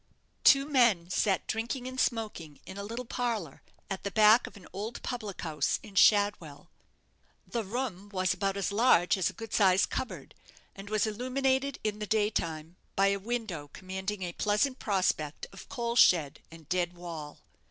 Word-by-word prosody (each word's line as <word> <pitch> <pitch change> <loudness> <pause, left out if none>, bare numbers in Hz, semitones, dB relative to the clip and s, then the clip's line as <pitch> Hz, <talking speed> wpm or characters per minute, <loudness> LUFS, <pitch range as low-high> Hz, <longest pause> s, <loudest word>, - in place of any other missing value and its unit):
Two 275 0 +6
men 235 - +3
sat 190 0 +1
drinking 235 +3 -3
and 255 0 -6
smoking 210 - -2
in 190 - -9
a 200 - -5
little 230 +4 -5
parlour 225 - -3 0.3
at 195 -1 -4
the 200 - -3
back 215 +3 +5
of - - -12
an 185 - -14
old 215 +4 -5
public 215 -6 -5
house 150 -4 -1
in 205 - -12
Shadwell. 185 -7 +3 0.7
The 235 -2 -3
room 205 -2 -4
was 185 -2 0
about 195 -1 -1
as 200 0 -1
large 200 -5 +4
as 190 -3 +1
a - - -9
good 225 -2 -9
sized 190 -2 +4
cupboard, 255 - -5 0.4
and 195 +1 -9
was 215 0 +1
illuminated 260 +4 0
in 210 -1 -2
the 210 - -4
day 215 0 +2
time 165 -1 -4 0.2
by 195 0 +4
a 200 - +1
window 205 -9 -4
commanding 190 +1 -5
a 175 -1 -4
pleasant 215 +8 0
prospect 185 -7 -1
of - - -12
coal 235 -3 -2
shed 160 - +4
and 165 -2 -14
dead 175 0 0
wall. 165 -4 -8
205 Hz, 175 wpm, -30 LUFS, 180-230 Hz, 0.7 s, Two